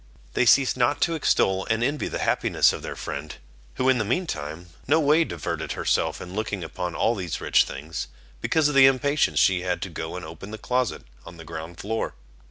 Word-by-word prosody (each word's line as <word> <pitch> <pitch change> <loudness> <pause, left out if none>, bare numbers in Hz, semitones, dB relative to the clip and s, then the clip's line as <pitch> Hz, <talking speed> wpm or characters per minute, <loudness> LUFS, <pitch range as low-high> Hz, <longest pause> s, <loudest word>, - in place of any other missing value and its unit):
They 125 - +2
ceased 135 +2 +5
not 125 +3 +1
to 170 - +2
extol 95 -11 +1
and 115 +1 +1
envy 145 +4 0
the - - -3
happiness - - +3
of - - -6
their - - -6
friend, 75 +2 -6 0.4
who 130 - 0
in 130 -2 +4
the - - +1
mean 125 - 0
time 80 - -6 0.2
no 155 +4 +4
way 155 +2 +4
diverted 85 - -4
herself - - 0
in 90 - -8
looking 105 -3 -3
upon 85 +2 -5
all 115 - +2
these 90 -7 -4
rich - - +3
things, 75 +4 -6 0.3
because 160 -2 +2
of 150 - -1
the 135 -1 +8
impatience 140 +3 +2
she 90 -2 +4
had 90 -1 -1
to - - -5
go - - -5
and - - -6
open 100 - -9
the 110 - -6
closet 125 +1 -1 0.2
of 85 - -12
the 80 - -11
ground 80 +1 -7
floor. 110 +2 -3
110 Hz, 210 wpm, -25 LUFS, 85-135 Hz, 0.4 s, the